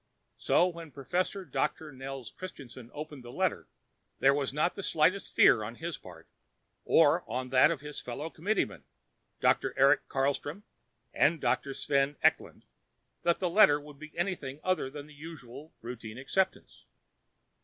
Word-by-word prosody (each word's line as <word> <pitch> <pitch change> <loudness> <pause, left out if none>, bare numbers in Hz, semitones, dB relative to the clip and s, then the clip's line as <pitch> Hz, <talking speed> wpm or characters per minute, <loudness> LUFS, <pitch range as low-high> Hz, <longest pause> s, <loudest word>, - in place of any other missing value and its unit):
So 175 - +4
when 170 -2 -7
Professor 180 +8 -2
Doctor 155 +1 -2
Nels 135 -3 -7
Christianson 130 -9 -10
opened 150 -3 -8
the 120 - -9
letter, - - -1 0.5
there 135 +1 +5
was 140 -1 -1
not 150 +5 +1
the 200 - -6
slightest 185 +2 +1
fear 115 - +6
on 110 +3 -6
his 165 +3 -4
part, 85 -3 -13 0.6
or - - +5
on 125 +2 -3
that 130 +3 +6
of 165 -5 -2
his 150 -1 -6
fellow 145 +6 -5
committeemen, 160 - -1 0.6
Dr. - - +2
Eric 135 +2 +4
Carlstrom 145 +7 -1 0.5
and 165 - +3
Dr. 135 +2 0
Sven 140 +1 +1
Eklund, - - +1 0.6
that 170 -1 +2
the 185 - -1
letter 170 -5 +6
would 145 -1 -13
be 155 0 -10
anything 165 -7 -3
other 185 -7 0
than 145 +1 -8
the 150 - -15
usual 150 -2 -10
routine 115 -2 -7
acceptance. 190 +8 -2
145 Hz, 150 wpm, -30 LUFS, 130-165 Hz, 0.6 s, fear